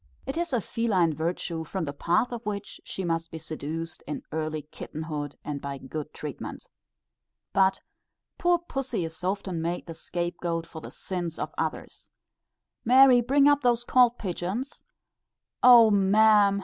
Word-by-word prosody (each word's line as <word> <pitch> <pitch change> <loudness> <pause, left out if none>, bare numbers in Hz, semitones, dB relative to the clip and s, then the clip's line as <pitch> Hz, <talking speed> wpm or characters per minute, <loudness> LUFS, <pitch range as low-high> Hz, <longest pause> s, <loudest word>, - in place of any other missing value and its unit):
It 270 - -4
is 340 -1 -2
a 250 - +2
feline 190 -5 +1
virtue, 165 +1 -3
from 185 +3 -4
the 140 -2 -4
path 175 +11 +1
of 240 -1 -5
which 205 -2 -5
she 190 - -5
must 165 -1 -1
be 160 - -7
seduced 160 +1 -6
in 150 - -4
early 155 -1 -3
kitten 155 +1 -8
hood, 145 -3 -4
and 145 -2 -4
by 140 -1 -5
good 150 +3 -6
treatment. 150 -3 -7 0.9
But 190 0 +3 0.6
poor 350 0 +4
pussy 270 - -3
is 160 +2 -9
often 185 -2 -2
made 170 +2 -2
the 165 - -7
scape 175 +1 -4
goat 165 -1 -2
for 160 - -10
the - - -8
sins 175 -4 -5
of - - -4
others. - - -4 0.7
"Mary, 255 +1 +7
bring 275 +4 +4
up 290 0 +4
those 240 -2 +2
cold 245 -1 +4
pigeons." 195 +7 -4 0.8
"O 235 -3 +8
ma'am! 205 0 +5
180 Hz, 160 wpm, -27 LUFS, 160-235 Hz, 0.9 s, O